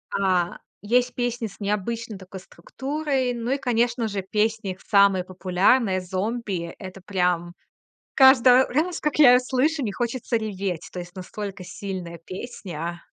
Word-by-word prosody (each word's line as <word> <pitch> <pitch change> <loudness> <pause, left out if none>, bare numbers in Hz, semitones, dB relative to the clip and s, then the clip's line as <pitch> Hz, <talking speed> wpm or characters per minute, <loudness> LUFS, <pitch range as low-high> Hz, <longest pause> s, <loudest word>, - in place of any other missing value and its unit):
А, 185 -3 +1 0.3
есть 245 +4 +2
песни 240 -1 -2
с 195 - -15
необычной 210 +1 -3
такой 190 0 -10
структурой. 270 - -3
Ну 235 0 -4
и, 275 - +2
конечно 240 -2 0
же, 200 -2 -3
песни, 210 +1 -1
их 185 - -19
самая 200 -3 +4
популярная 185 +3 +2
"Зомби"- 190 -1 -3
это 190 -1 -9
прям 180 -2 0 0.6
Каждый 260 -1 +7
раз, 330 +7 -1
как 300 -1 -1
я 285 -5 +9
её 250 - +6
слышу, 265 +4 0
мне 210 -4 -2
хочется 240 +1 -2
реветь. 195 -6 -4
То - - -9
есть 175 +1 -9
настолько 195 +1 -6
сильная 180 -3 -6
песня. 175 -5 -6
205 Hz, 145 wpm, -24 LUFS, 185-245 Hz, 0.6 s, я